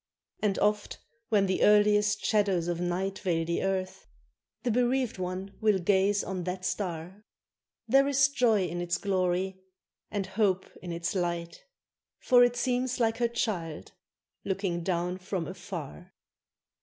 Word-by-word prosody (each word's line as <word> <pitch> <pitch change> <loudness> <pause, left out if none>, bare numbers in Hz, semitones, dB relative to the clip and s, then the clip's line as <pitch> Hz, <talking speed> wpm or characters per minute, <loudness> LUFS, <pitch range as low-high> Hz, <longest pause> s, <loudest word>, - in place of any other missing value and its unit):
And 205 -2 +1
oft, 210 0 0 0.3
when 205 -3 +3
the 190 -1 0
earliest 210 0 +4
shadows 195 -5 +2
of 175 0 -2
night 185 +2 -2
Veil 165 -3 0
the 170 +1 -1
earth, 190 -1 -2 0.6
the 245 - +1
bereaved 250 -1 +1
one 185 +2 -4
will 215 -2 +4
gaze 195 +2 +2
on 185 -2 -4
that 185 0 -4
star; 180 +1 -4 0.6
There 270 +4 +5
is 275 0 +4
joy 235 -8 +2
in 175 0 -4
its 175 0 -1
glory 190 -1 -1 0.5
and 205 -2 -2
hope 190 -1 +1 0.2
in 180 - -6
its 170 0 -2
light, 175 - -3 0.5
For 245 -1 +5
it 245 0 +3
seems 250 0 0
like 225 -1 +2
her 240 0 +2
child 180 -9 -3 0.5
looking 190 -3 -2
down 180 +1 -1
from 185 -2 -3
afar. 180 -1 -8
190 Hz, 145 wpm, -29 LUFS, 180-215 Hz, 0.6 s, There